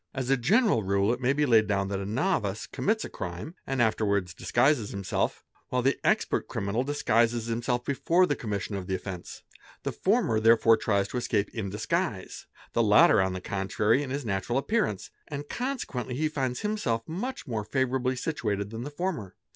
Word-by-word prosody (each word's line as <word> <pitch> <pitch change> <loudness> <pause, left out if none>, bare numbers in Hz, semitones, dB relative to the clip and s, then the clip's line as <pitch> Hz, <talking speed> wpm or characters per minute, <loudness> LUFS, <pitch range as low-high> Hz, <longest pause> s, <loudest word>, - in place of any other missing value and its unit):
As 130 0 -1
a - - +6
general 180 - +3
rule 100 +2 +2
it 125 - -5
may 125 +1 +3
be 145 +1 +2
laid 115 -5 +4
down 100 -1 0
that 100 -1 -2
a 100 - -4
novice 115 - 0
commits 220 +2 -1
a - - -4
crime 90 - -6
and 135 -1 -1
afterwards 100 -5 +1
disguises 120 0 +2
himself; 100 -1 -2 0.3
while 125 -1 0
the 135 +2 +2
expert - - +1
criminal 100 +5 -1
disguises 120 -5 +1
himself 120 +1 -1
before 170 +6 +3
the 145 - 0
commission 105 -4 -4
of 95 -2 -5
the 95 - 0
offence. 90 -1 -7 0.4
The - - -1
former 195 - +1
therefore 115 0 +5
tries 100 -3 +1
to - - -3
escape 105 -4 -1
in 110 -5 -3
disguise; 110 - -3 0.3
the 115 - +3
latter, 105 -1 +6
on 95 0 0
the 95 - -5
con 95 +1 -3
trary, 110 +7 +2
in 140 - -4
his 140 0 -3
natural 100 +4 -1
appearance, 135 - -1 0.2
and 145 -1 -6
consequently 235 - -3
he 155 +3 0
finds 130 -4 -2
himself 125 - -1
much 245 +11 -4
more 115 -6 -3
favourably 130 +2 0
situated 105 -8 -2
than 115 0 -5
the 145 - -5
former. 145 - -4
115 Hz, 185 wpm, -28 LUFS, 100-145 Hz, 0.4 s, a